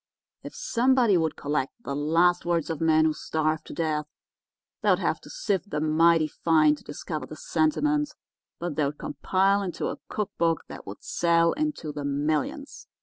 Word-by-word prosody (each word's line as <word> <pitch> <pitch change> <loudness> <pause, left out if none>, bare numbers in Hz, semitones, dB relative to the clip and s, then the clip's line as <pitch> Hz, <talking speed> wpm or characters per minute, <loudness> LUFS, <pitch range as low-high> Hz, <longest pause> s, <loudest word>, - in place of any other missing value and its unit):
If - - -9
somebody 255 - +3
would 160 -2 +1
collect 145 -2 -2
the 140 - -4
last 165 +4 +3
words 170 -2 0
of 160 - -4
men 160 -1 +4
who 155 - +2
starved 155 0 -2
to - - -8
death, 155 -2 -1 0.7
they'd - - +4
have - - -1
to - - -13
sift 205 - -2
'em 155 +1 0
mighty 165 -1 +5
fine 155 -1 +3
to - - -17
discover 150 +1 -6
the 155 - -9
sentiment, 295 - +1 0.5
but 175 -3 -4
they'd 145 -1 0
compile 195 +7 +1
into 185 -3 -3
a - - -6
cook 210 -2 -2
book 165 -1 +2
that - - -10
would - - -9
sell 170 - +2
into 300 - -2
the 145 0 -6
millions. 145 +1 -2
165 Hz, 170 wpm, -26 LUFS, 150-190 Hz, 0.7 s, mighty